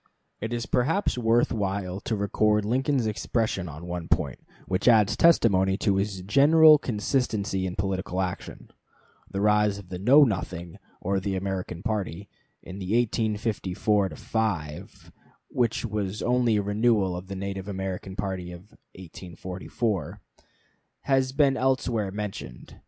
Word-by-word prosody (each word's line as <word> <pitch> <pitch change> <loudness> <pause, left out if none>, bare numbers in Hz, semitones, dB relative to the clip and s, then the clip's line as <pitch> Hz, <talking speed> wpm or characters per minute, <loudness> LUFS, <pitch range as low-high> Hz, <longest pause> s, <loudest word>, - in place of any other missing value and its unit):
It 110 +2 -4
is 120 -1 -2
perhaps 160 +11 +1
worth 120 -1 +2
while 95 -3 -2
to 110 - -2
record 105 +1 +1
Lincoln's 130 +2 +1
expression 110 -4 -1
on 75 +3 -9
one 90 -1 -5
point, 65 -3 0 0.3
which 95 +4 -1
adds 105 -3 +5
testimony 95 - +4
to 100 -2 +1
his 100 -1 -2
general 150 - +6
consistency 105 -5 -1
in 90 - -5
political 95 -1 -2
action. 90 -2 -5 0.6
The 100 - -3
rise 105 -1 +3
of 100 -3 -11
the 90 -1 -5
Know 135 +9 +7
Nothing 90 -7 -3 0.2
or 95 +1 0
the 95 0 -2
American 95 -2 -4
party, 100 -4 -3 0.3
in 95 - -9
1854 105 -1 0
5 90 -12 -4 0.4
(which 120 -1 0
was 105 -2 -3
only 120 -2 +2
a 105 - +1
renewal 105 -2 +1
of 90 +1 -7
the 100 - -6
Native 95 0 -5
American 95 -1 -5
party 95 -3 -4
of 90 +4 -12 0.2
1844), 90 - -5 0.8
has 135 -1 +1
been 140 0 +3
elsewhere 125 -5 0
mentioned. 95 - -7
100 Hz, 135 wpm, -26 LUFS, 95-115 Hz, 0.8 s, Know